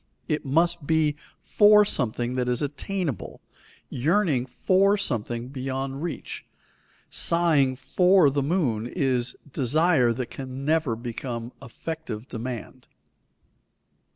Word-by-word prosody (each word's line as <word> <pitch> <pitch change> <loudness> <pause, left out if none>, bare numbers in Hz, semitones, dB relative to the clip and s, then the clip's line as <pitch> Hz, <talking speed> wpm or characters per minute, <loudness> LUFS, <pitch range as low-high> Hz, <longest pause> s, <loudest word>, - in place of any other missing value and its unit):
It 150 -2 -1
must 165 +2 +1
be 155 -2 +2 0.3
for 210 0 +6
something 120 - 0
that 125 -1 -1
is 125 +3 0
attainable; 145 - -4 0.5
yearning 150 -2 +1
for 195 +9 +2
something 120 - -2
beyond 135 +1 -4
reach, 170 -2 -5 0.7
sighing 155 -6 +2
for 165 +5 +4
the 140 +1 0
moon, 135 - 0
is 130 -5 -1 0.2
desire 145 -1 +3
that 120 +2 -5
never 135 +1 -1
can 115 - -13
become 120 0 -5
effective 130 -2 -7
demand. 120 -1 -7
135 Hz, 105 wpm, -25 LUFS, 125-165 Hz, 0.7 s, for